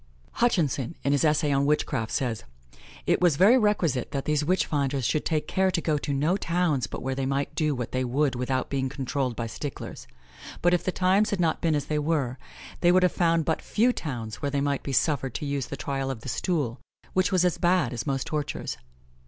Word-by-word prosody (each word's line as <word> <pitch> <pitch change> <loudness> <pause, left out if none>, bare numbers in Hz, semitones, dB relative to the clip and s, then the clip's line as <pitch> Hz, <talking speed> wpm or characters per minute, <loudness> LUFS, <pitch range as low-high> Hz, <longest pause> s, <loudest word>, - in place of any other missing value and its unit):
Hutchinson, 165 - 0
in 140 - +1
his 145 +1 +2
essay 150 -1 +2
on 140 0 +2
witchcraft, 115 -6 0
says: 120 -6 -1 0.6
"It - - +2
was 175 -5 +4
very 200 - +6
requisite 205 - +1
that 135 -1 -2
these 150 -1 +1
witch 185 +5 +2
finders 140 -3 -1
should 155 - 0
take 155 -2 0
care 190 0 +2
to 180 -2 0
go 155 -3 0
to 145 - -3
no 150 +7 +1
towns 165 -8 0
but - - -7
where 135 +1 -1
they 135 0 -2
might 140 +1 -1
do 155 -2 0
what 120 -2 -4
they 130 0 0
would 135 +2 +1
without 125 +1 -1
being 135 -1 0
controlled 135 -2 -2
by 115 - -3
sticklers; 115 +5 -7 0.6
but 175 +1 +4
if 175 - +2
the 185 - 0
times 190 +4 +2
had 200 - -1
not 165 -2 +1
been 160 -2 +2
as 145 -2 -1
they 150 -1 -1
were, 145 -5 -1 0.4
they 175 - +4
would 185 +1 +4
have 180 - +4
found 165 -2 +2
but 160 - 0
few 240 +4 +2
towns 120 - -5
where 145 - 0
they 140 0 -1
might 140 -1 0
be 140 - -5
suffered 135 -3 +1
to - - -3
use 140 -2 -2
the 140 - -6
trial 135 -1 -2
of 130 -4 -4
the 130 - -6
stool, 135 -4 -1 0.3
which 185 +1 +2
was 180 -1 +3
as 180 - +1
bad 175 -8 +2
as 120 +2 -4
most 135 -2 -1
tortures. 150 -2 -3
145 Hz, 225 wpm, -26 LUFS, 135-170 Hz, 0.6 s, very